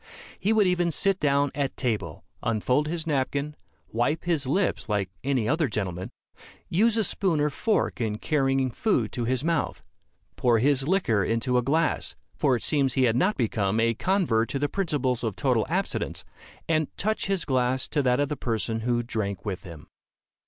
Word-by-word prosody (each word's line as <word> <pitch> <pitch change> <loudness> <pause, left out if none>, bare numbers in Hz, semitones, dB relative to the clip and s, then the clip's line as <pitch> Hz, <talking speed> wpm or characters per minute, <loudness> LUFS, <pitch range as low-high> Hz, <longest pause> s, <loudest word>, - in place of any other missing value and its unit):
He 210 - +1
would 220 -2 +4
even 180 -1 +2
sit 190 +4 +1
down 140 -1 +2
at 140 -1 -2
table, 105 - -2 0.2
unfold 125 +6 +1
his 165 0 -2
napkin, 145 0 -1 0.3
wipe 120 +8 0
his 160 -6 0
lips 180 - 0
like 100 -3 0
any 130 -5 0
other 155 +2 +2
gentleman, 95 -5 -3 0.6
use 220 +6 +3
a 220 - +3
spoon 180 -4 +1
or 150 0 +1
fork 215 - 0
in 110 -2 -1
carrying 135 -1 +1
food 125 - 0
to 120 - -2
his 130 +2 0
mouth, 165 -2 -1 0.5
pour 120 -2 +3
his 135 +3 +2
liquor 155 - +2
into 115 +5 0
a 125 - +4
glass 155 +6 0 0.2
for 135 -4 +2
it 120 - -4
seems 140 -4 +2
he 130 - +3
had 115 -2 +3
not 185 - +2
become 110 -3 0
a 115 +1 +3
convert 130 - +1
to - - -1
the 145 +1 0
principles 145 -10 -1
of 110 -4 -2
total - - +1
abstinence - - -2 0.4
and 155 -2 +2
touch 215 +1 -1
his 195 -3 0
glass 130 -1 +1
to 145 - +1
that 125 -1 +2
of 145 - +2
the 150 - -3
person 115 -3 -2
who 120 +1 0
drank 110 -4 -3
with 95 -4 -4
him. 85 -4 -10
135 Hz, 180 wpm, -26 LUFS, 115-160 Hz, 0.6 s, would